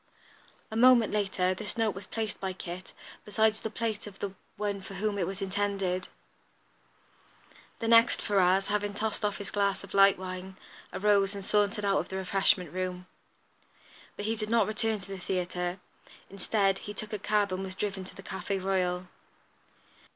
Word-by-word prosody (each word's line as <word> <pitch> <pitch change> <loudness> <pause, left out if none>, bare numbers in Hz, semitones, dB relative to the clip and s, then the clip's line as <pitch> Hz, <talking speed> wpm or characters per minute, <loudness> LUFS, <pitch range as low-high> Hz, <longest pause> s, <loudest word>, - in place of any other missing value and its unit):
A - - -4
moment 240 -2 +6
later 190 -3 +1
this 210 +4 -6
note 225 -3 +2
was 195 +2 -9
placed, 220 -2 -3
by 190 -1 -2
Kit, 180 0 -7 0.3
beside 220 +1 +3
the 220 +1 -5
plate 220 -1 -3
of 195 -2 -10
the 200 -2 -4 0.2
one 205 -1 -2
for 195 0 -9
whom 205 +1 -1
it 175 - +1
was 195 +1 -4
intended. 195 -2 -1 1.7
The 225 - -3
next, 230 0 +6
Ferrars, 195 -1 +3
having 205 -1 0
tossed 215 +1 -2
off 205 -1 0
his 200 -1 -6
glass 200 -1 +1
of 200 - -11
light 195 0 +6
wine, 185 0 -6 0.3
arose 200 0 +3
and 200 -1 -5
sauntered 210 +1 +2
out 195 -1 +3
of - - -4
the 190 - -5
refreshment 190 -3 +2
room. 180 0 -3 1.1
But 205 - -5
he 225 +1 +1
did 215 -1 -4
not 230 -2 +4
return 220 0 0
to 185 - -12
the 195 -1 -6
theatre. 180 0 -2 0.5
Instead, 195 0 +1
he 205 - -7
took 215 +1 -6
a 210 - -2
cab 205 -1 +1
and 185 +1 -2
was 185 -1 -5
driven 195 -1 -2
to - - -10
the 195 - -10
Café 195 +1 -3
Royal. 185 -1 0
200 Hz, 175 wpm, -30 LUFS, 190-210 Hz, 1.7 s, moment